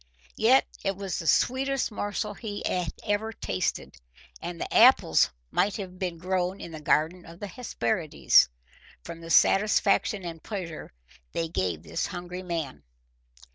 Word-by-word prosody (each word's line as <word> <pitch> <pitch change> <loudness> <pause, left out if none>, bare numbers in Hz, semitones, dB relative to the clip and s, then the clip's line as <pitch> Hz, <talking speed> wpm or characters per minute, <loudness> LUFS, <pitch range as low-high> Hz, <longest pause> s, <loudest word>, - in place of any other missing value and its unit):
Yet - - +5 0.2
it 195 - 0
was 195 -2 -3
the 165 - -5
sweetest 270 +4 +2
morsel 205 0 -3
he 205 -1 -6
had 180 -3 -1
ever 215 +1 -1
tasted, 95 - -3 0.4
and 175 -1 -6
the - - -4
apples 235 - +6 0.2
might 205 - +1
have 185 -3 -7
been 180 -3 -3
grown 185 +2 -1
in 170 - -8
the 155 -1 -8
garden 160 +4 +1
of 170 +1 -13
the - - -5
Hesperides 170 - +2 0.5
from 165 - -8
the 165 - -9
satisfaction 200 +1 +3
and 165 -2 -6
pleasure 180 -7 -6 0.4
they 165 -1 -1
gave 90 - -2
this - - -2
hungry 175 +1 -6
man. 165 -7 -4
180 Hz, 145 wpm, -27 LUFS, 165-205 Hz, 0.5 s, apples